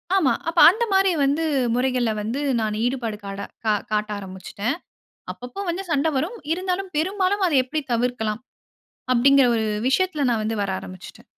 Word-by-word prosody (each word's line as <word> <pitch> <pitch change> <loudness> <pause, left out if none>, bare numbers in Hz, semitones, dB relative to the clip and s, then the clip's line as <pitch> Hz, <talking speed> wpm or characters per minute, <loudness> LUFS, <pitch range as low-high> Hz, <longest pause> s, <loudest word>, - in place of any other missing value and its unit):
ஆமா. 325 -9 +3 0.2
அப்ப - - 0
அந்தமாரி 390 -2 +2
வந்து 285 +4 +1 0.3
முறைகள்ல 250 -2 +1
வந்து 225 +6 -3 0.2
நான் 215 -1 -1
ஈடுபாடு 240 -4 -2
காட 195 0 -6 0.3
கா 215 - +3 0.2
காட்ட 210 0 0
ஆரம்பிச்சுட்டேன். 200 +5 -4 0.6
அப்பப்ப 250 +11 -7
வந்து 355 +3 -2
சண்ட 290 0 +2
வரும், 360 - -2 0.2
இருந்தாலும் 370 +2 -3
பெரும்பாலும் 380 +4 +1
அத 335 - -1
எப்பிடி 305 +4 -3
தவிர்க்கலாம். 230 -2 -1 0.7
அப்பிடிங்கற 270 +2 +5
1 220 - 0 0.2
விஷயத்துல 305 0 +1
நான் 225 -2 0
வந்து 220 +1 -2
வர 195 - -2
ஆரம்பிச்சுட்டேன். 185 0 -11
265 Hz, 150 wpm, -23 LUFS, 220-360 Hz, 0.7 s, அப்பிடிங்கற